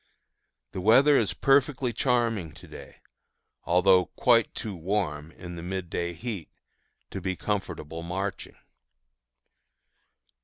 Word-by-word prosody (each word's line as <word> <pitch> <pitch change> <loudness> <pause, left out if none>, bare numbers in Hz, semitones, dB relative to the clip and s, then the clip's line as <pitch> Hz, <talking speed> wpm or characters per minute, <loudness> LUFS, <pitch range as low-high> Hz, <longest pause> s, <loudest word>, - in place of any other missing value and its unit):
The 95 - -5
weather 135 +9 +6
is - - +1
perfectly 135 -2 +2
charming 115 - 0
to - - -14
day, - - -12 0.7
although 90 +1 +4
quite 115 -2 +3
too 105 -3 -4
warm, 80 -4 -2
in 90 0 -9
the 85 - -7
midday 90 -1 -3
heat, 100 -2 -6 0.6
to 95 - -5
be 95 0 -2
comfortable 85 -6 -4
marching. 95 +3 -4
95 Hz, 110 wpm, -27 LUFS, 85-115 Hz, 0.7 s, weather